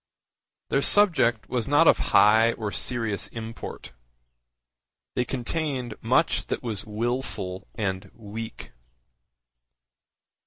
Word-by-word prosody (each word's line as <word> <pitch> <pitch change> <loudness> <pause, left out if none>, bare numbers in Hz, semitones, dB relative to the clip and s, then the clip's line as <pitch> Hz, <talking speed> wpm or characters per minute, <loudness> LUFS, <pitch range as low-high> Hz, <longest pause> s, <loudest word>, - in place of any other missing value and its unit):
Their 135 - +2
subject 160 - +4
was 120 -3 -1
not 145 +3 +4
of - - +6
high 110 +3 +5
or 105 -3 -4
serious 115 -5 -1
import. 115 - -8 1.2
They 125 - +1
contained 130 -1 -3
much 130 +8 +1
that - - -3
was 110 -4 -4
wilful 110 -4 -3
and 95 -4 -3
weak. 110 +1 -8
115 Hz, 100 wpm, -25 LUFS, 105-130 Hz, 1.2 s, of